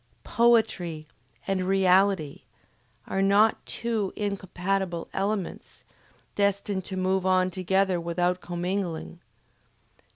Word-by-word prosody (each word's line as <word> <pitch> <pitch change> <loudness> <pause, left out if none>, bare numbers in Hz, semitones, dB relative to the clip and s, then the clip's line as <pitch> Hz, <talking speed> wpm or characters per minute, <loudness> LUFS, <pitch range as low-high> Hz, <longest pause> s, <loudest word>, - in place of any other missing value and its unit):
POETRY 220 -9 +2 0.4
and 190 -1 -1
REALITY 190 -4 +2 0.6
are 195 - -1
not 200 +3 +3
two 225 -5 -2
incompatible 190 -3 -2
elements, 195 -1 -3 0.5
destined 200 -1 0
to 190 - -5
move 185 0 +1
on 185 0 +2
together 190 0 +1
without 175 +2 -1
commingling. 175 -1 -4
190 Hz, 90 wpm, -26 LUFS, 180-200 Hz, 0.6 s, not